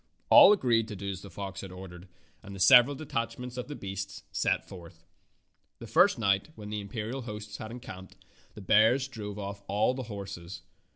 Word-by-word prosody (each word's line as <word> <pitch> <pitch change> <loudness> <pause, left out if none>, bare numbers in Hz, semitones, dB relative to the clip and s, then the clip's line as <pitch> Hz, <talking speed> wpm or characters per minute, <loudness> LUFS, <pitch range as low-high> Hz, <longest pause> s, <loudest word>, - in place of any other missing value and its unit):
All - - +10
agreed 120 - +2
to 105 - -7
do 100 +1 -4
as 95 -1 -7
the 100 - -11
fox 95 +1 -7
had 95 - -9
ordered, 90 0 -11 0.3
and 100 0 -10
the - - -9
several 125 +8 +7
detachments 125 -3 -4
of 125 - -5
the 145 - -6
beasts 100 -1 -6
set - - 0
forth. 85 -2 -13 0.7
The - - -10
first 180 - +4
night, 100 +1 +1
when 105 -1 -9
the 105 -1 -3
imperial 110 +5 -5
host 105 -2 -8
had 110 - -7
encamped, 95 -6 -10 0.4
the 105 - -9
bears 110 +7 +4
drove 105 -5 -7
off 100 0 -6
all 105 +5 +1
the 130 - -5
horses. 95 -4 -8
105 Hz, 185 wpm, -29 LUFS, 95-120 Hz, 0.7 s, All